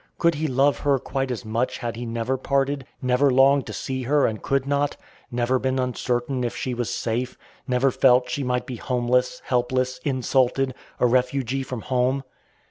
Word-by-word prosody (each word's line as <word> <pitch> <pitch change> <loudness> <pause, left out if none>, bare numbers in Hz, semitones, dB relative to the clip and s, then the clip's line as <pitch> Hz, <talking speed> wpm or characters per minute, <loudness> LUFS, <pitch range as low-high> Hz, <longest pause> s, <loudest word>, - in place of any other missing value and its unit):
Could 170 0 +3
he 155 +1 -1
love 135 +2 +2
her 140 -2 +2
quite 135 +1 -3
as 125 -1 -4
much 115 +3 -1
had 120 -3 -4
he 120 +1 -5
never 115 +3 -1
parted; 135 0 -1 0.2
never 130 +3 +3
longed 135 +1 +4
to - - -5
see 130 0 -3
her 140 +3 +2
and 110 -2 -2
could 135 -1 0
not; 145 0 0 0.3
never 125 +1 +1
been 130 0 0
uncertain 125 0 -1
if 120 - -2
she 130 - -3
was 120 -1 -2
safe; 120 +2 -2 0.3
never 130 +1 +2
felt 125 -1 +4
she 130 +3 -2
might 125 -1 -1
be 125 - -6
homeless, 125 +1 0
helpless, 130 +1 0
insulted, 130 -1 +1 0.3
a - - +4
refugee 130 +1 +1
from 125 -3 -5
home? 130 +2 0
130 Hz, 180 wpm, -24 LUFS, 125-135 Hz, 0.3 s, longed